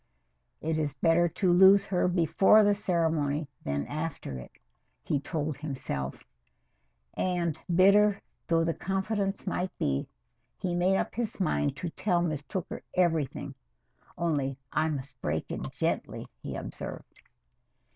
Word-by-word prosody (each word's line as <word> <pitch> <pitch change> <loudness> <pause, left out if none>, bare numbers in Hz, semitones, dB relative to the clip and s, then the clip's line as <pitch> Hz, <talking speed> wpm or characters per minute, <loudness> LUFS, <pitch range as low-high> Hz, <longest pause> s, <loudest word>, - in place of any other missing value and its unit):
"It 160 0 -1
is 145 -2 -1
better 165 +5 +3
to 180 +1 +2
lose 190 +2 +7
her 180 -2 +1
before 185 +4 +5
the 205 0 +4
ceremony 160 -7 0 0.2
than 70 0 -1
after 150 - -4
it," 65 - -10 0.5
he 145 - 0
told 150 -1 -3
himself, 130 - -4 0.9
and, 170 -4 -1 0.2
bitter 200 +2 +5 0.3
though 165 -1 +3
the 165 0 +1
confidence 195 +2 -2
might 185 -1 -1
be, 70 -1 0 0.5
he 180 -2 -2
made 180 +2 +3
up - - -2
his 230 -3 -3
mind 145 -6 +1
to 170 +4 -4
tell 180 -2 +1
Miss 155 -4 -1
Tooker 160 +5 -5
everything. 165 -6 +1 0.6
"Only, 145 -6 0
I 155 +1 +1
must 140 -3 -6
break 80 +1 -1
it - - -4
gently," - - -2 0.2
he - - -5
observed. - - -7
165 Hz, 135 wpm, -29 LUFS, 145-185 Hz, 0.9 s, lose